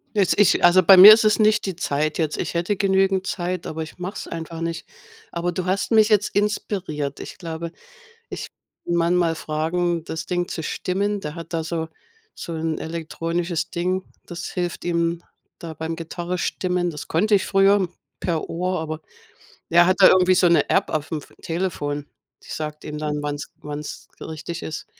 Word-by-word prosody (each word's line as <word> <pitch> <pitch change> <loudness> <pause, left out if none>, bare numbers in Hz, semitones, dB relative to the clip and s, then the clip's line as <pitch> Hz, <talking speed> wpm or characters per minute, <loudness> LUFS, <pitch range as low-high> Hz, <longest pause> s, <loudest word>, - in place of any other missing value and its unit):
Jetzt 200 0 +2
ich 205 - +4
also, 175 +2 +7
bei 190 +2 +8
mir 200 +4 +13
ist 225 0 +3
es 215 - +4
nicht 215 -1 +3
die 190 - -3
Zeit 155 -2 -1
jetzt, 155 -3 -1
ich - - -3
hätte 175 +4 -1
genügend 190 -1 +2
Zeit, 180 -1 -3
aber 160 +1 -4
ich 155 - -11
mach's 180 +3 -6
einfach 165 0 -6
nicht. 165 0 -4 0.4
Aber, 175 +1 -2
du 180 +1 -3
hast 190 +5 -1
mich 220 -1 +5
jetzt 210 -1 +3
inspiriert, 190 -8 -2
ich - - -8
glaube, 165 -1 -6 0.6
ich - - -6 0.4
Mann 170 0 +1
mal 165 -2 +2
fragen, 165 +2 -1
das 160 +1 -5
Ding 175 -1 -1
zu 160 - -5
stimmen. 200 +5 -2
Der 150 +2 -6
hat 165 0 -9
da 165 - -1
so 160 0 -3 0.5
so 170 - -7
'n 160 0 -2
elektronisches 165 +1 -3
Ding, 185 +2 -1 0.2
das 175 -1 -7
hilft 175 -1 -3
ihm 170 0 0 0.4
da 165 -2 -7
beim 160 +2 -4
Gitarre 175 +2 -4
stimmen. 180 -1 -1
Das 150 -3 -7
konnte 205 +6 +2
ich 190 - +1
früher 195 -1 +4 0.3
per 165 -3 -2
Ohr, 180 +1 -1
aber 155 0 -4 0.7
er 175 +1 +6
hat 185 - +3
da 190 - +9
irgendwie 185 0 +5
so 180 - +4
'ne 170 -1 +3
App - - +2
auf 155 0 -2
'm 160 - -1
F - - -17
Telefon. 155 -4 -3 0.4
Die - - -16
sagt 150 -1 -5
ihm 150 0 -6
dann, 150 -1 -2
wann's 145 0 -4
wann's 150 0 -7
richtig 160 +2 -6
ist. 160 - -6
170 Hz, 185 wpm, -22 LUFS, 160-185 Hz, 0.7 s, mir